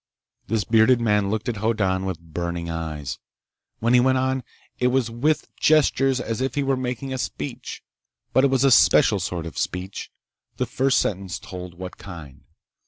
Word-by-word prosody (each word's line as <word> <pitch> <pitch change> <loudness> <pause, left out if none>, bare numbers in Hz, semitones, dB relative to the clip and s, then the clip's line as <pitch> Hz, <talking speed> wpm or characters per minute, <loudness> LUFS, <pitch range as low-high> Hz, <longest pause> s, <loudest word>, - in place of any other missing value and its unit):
This 110 -1 0
bearded 115 +3 +4
man 105 -3 +2
looked 110 +3 -2
at 120 -3 -2
Hoddan 100 -4 0
with 95 -4 -3
burning 85 +1 -4
eyes. 75 -5 -4 0.6
When 115 +2 +1
he 125 - +7
went 130 +1 +3
on, 130 0 0 0.4
it 125 - +3
was 125 -2 +1
with 145 +7 0
gestures 135 -3 +3
as 115 0 -3
if 130 -1 -1
he 145 - +1
were 135 0 +1
making 130 +1 -3
a 130 - -3
speech, 75 - -5 0.5
but 130 - +4
it 140 - +5
was 135 -1 +2
a 135 - +5
special 115 -3 +5
sort 90 -2 -3
of 80 - -6
speech. 90 +2 -4 0.5
The - - 0
first 130 +1 +1
sentence 95 -6 -1
told 90 -1 -9
what 90 +1 -8
kind. 80 -8 -10
110 Hz, 175 wpm, -23 LUFS, 90-130 Hz, 0.6 s, he